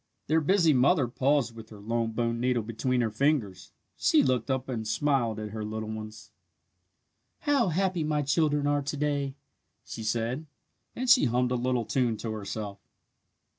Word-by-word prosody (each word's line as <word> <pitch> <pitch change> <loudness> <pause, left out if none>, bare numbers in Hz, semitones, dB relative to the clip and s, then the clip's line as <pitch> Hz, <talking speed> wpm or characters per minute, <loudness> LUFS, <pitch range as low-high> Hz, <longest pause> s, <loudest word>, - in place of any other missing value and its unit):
Their 160 +2 +2
busy 170 0 +4
mother 135 +2 +3
paused 130 -1 +1
with 110 -1 -11
her 105 - -12
long 115 +2 -2
bone 115 0 -1
needle 125 -1 +1
between 120 +3 -1
her 115 -2 0
fingers. 110 -7 0 0.2
She - - +3
looked 125 -2 0
up 130 0 -1
and 115 -4 -4
smiled 120 -4 +1
at 105 -1 -5
her 110 0 -5
little 110 0 -4
ones. 110 0 -8 1.1
"How 280 -6 +2
happy 180 0 0
my 150 -1 0
children 145 0 +1
are 145 0 +2
to 140 +1 -4
day!" 140 -2 -1 0.5
she 115 - -7
said, 115 +7 -2 0.5
and 255 - -3
she 255 +1 +6
hummed 125 +1 +1
a - - +2
little 125 -1 0
tune 120 -3 0
to 115 - -4
herself. 105 -1 -5
125 Hz, 170 wpm, -28 LUFS, 110-145 Hz, 1.1 s, she